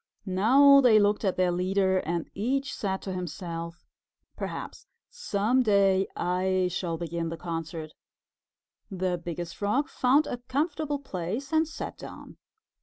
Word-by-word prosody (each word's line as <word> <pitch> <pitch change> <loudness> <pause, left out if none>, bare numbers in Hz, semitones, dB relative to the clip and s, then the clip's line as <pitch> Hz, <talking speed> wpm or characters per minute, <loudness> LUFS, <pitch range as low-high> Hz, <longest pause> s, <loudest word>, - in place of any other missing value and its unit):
Now 265 +9 +6
they 240 -4 +6
looked 205 +1 +2
at 190 -3 +1
their 180 -1 +2
leader 190 +1 +1
and 170 -1 -3
each 270 +7 -1
said 190 -2 -3
to 190 - -4
himself, 170 -1 -6 0.5
"Perhaps - - -6 0.2
some 255 - +1
day 195 -4 +3
I 185 +1 0
shall 170 -2 -2
begin 170 0 -3
the 165 - -5
concert." 165 -2 -5 1.0
The 185 -2 -2
Biggest 170 0 -5
Frog 230 +9 0
found 270 +4 +3
a - - -4
comfortable 290 +4 -2
place 240 - -5
and 315 0 +3
sat 315 - -7
down. - - -10
190 Hz, 135 wpm, -27 LUFS, 175-255 Hz, 1.0 s, Now